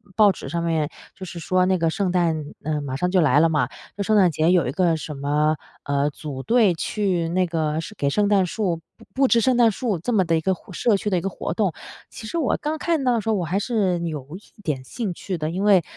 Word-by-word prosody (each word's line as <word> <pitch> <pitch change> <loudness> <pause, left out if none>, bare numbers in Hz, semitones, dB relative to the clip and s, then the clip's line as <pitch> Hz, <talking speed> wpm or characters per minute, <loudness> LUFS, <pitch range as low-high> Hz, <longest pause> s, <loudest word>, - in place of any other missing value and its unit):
报 210 -2 +6
纸 165 - -8
上 170 +3 -2
面 160 -3 0 0.3
就 190 - -10
是 175 - -8
说 185 +2 +2
那 190 0 +2
个 165 -1 +1
圣 190 +1 -1
诞 165 -4 +1 0.2
呃， 150 -1 -1
马 135 -2 -4
上 180 +6 0
就 185 -1 +4
来 150 -2 +4
了 165 - +5
嘛。 155 -2 +1 0.3
就 - - -3
圣 215 +2 +2
诞 190 -3 +5
节 160 +3 +2
有 175 -5 +3
一 - - -1
个 170 +2 +2
什 150 0 -6
么， 150 +2 +1 0.3
呃， 140 +1 0
组 145 -2 -7
队 225 - +4
去 180 -1 -1
那 185 +2 +1
个 160 -2 -1
是 210 - -8
给 140 -7 0
圣 205 +8 +2
诞 200 -2 +3
树 180 -2 -1 0.2
布 225 - -17
布 270 0 +3
置 235 - +5
圣 255 +3 +3
诞 235 -2 +5
树 215 -2 -2
这 245 - -3
么 195 -4 +3
的 165 0 +2
一 160 - +1
个 190 +4 +1
互 185 +1 -12
社 210 +4 +2
区 210 - -2
的 185 - +1
一 - - -1
个 195 - -2
活 175 - -4
动。 190 -2 0 0.4
其 220 - -9
实 335 - -3
我 310 -6 +1
刚 305 +1 -3
看 325 -2 0
到 250 -1 +3
的 230 - +1
时 225 - -3
候， 220 - +3
我 180 -4 -1
还 175 +4 -1
是 200 -6 0
有 155 -6 -4
一 210 +1 -20
点 145 -7 -2
兴 200 - -4
趣 185 +1 -5
的， 155 -1 -2
因 185 +3 -2
为 200 -4 +5
180 Hz, 290 characters per minute, -23 LUFS, 155-210 Hz, 0.4 s, 报